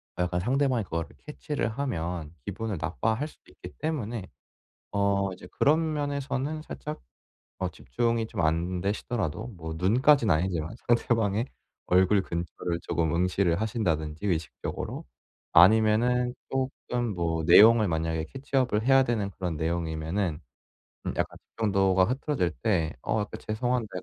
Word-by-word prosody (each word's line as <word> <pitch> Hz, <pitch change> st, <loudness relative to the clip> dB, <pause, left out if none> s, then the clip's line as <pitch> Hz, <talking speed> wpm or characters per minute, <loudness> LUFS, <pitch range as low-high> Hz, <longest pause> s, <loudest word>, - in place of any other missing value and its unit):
아 90 Hz, -, 0 dB
약간 90 Hz, 0 st, -1 dB
상대방이 130 Hz, +2 st, +1 dB
그거를 85 Hz, -3 st, -3 dB, 0.2 s
캐치를 150 Hz, -5 st, -3 dB
하면 85 Hz, -, -3 dB
기분을 100 Hz, 0 st, -3 dB
나빠할 110 Hz, -, -1 dB
수도 -, -, -19 dB
있기 -, -, -11 dB
때문에 120 Hz, -10 st, -3 dB, 0.7 s
어 100 Hz, -1 st, +1 dB
이제 90 Hz, -, -11 dB
그런 155 Hz, +2 st, +3 dB
면에서는 145 Hz, +1 st, -2 dB
살짝 150 Hz, -1 st, -7 dB, 0.6 s
어 -, -, -1 dB
집중이 115 Hz, -, -1 dB
좀 -, -, -4 dB
안되시더라도 90 Hz, +5 st, -1 dB
뭐 80 Hz, -7 st, -7 dB
눈까지는 115 Hz, -, +4 dB
아니지만 85 Hz, +1 st, -1 dB
상대방의 115 Hz, -1 st, +2 dB, 0.4 s
얼굴 95 Hz, +2 st, +4 dB
근처를 85 Hz, 0 st, -3 dB
쪼금 80 Hz, -2 st, 0 dB
응시를 90 Hz, +1 st, +1 dB
하신다든지 85 Hz, -6 st, -1 dB
의식적으로. 80 Hz, -6 st, -3 dB, 0.5 s
아니면은 110 Hz, +6 st, +5 dB, 0.2 s
쪼끔 125 Hz, -3 st, -2 dB
뭐 80 Hz, -2 st, -1 dB
내용을 110 Hz, +6 st, +8 dB
만약에 80 Hz, -2 st, -1 dB
캐치 135 Hz, +1 st, -4 dB
업을 120 Hz, -4 st, +2 dB
해야 135 Hz, 0 st, +6 dB
되는 115 Hz, -5 st, 0 dB
그런 90 Hz, -4 st, -4 dB
내용이면은 80 Hz, +1 st, -1 dB, 0.6 s
음 -, -, -2 dB
약간 -, -, -1 dB
집중도가 95 Hz, -4 st, +2 dB
흐트러질 130 Hz, -, 0 dB
때 85 Hz, -9 st, +1 dB
"어 110 Hz, -, 0 dB
약간 105 Hz, -, -5 dB
죄송한데 120 Hz, +1 st, 0 dB
100 Hz, 325 characters per minute, -28 LUFS, 85-120 Hz, 0.7 s, 내용을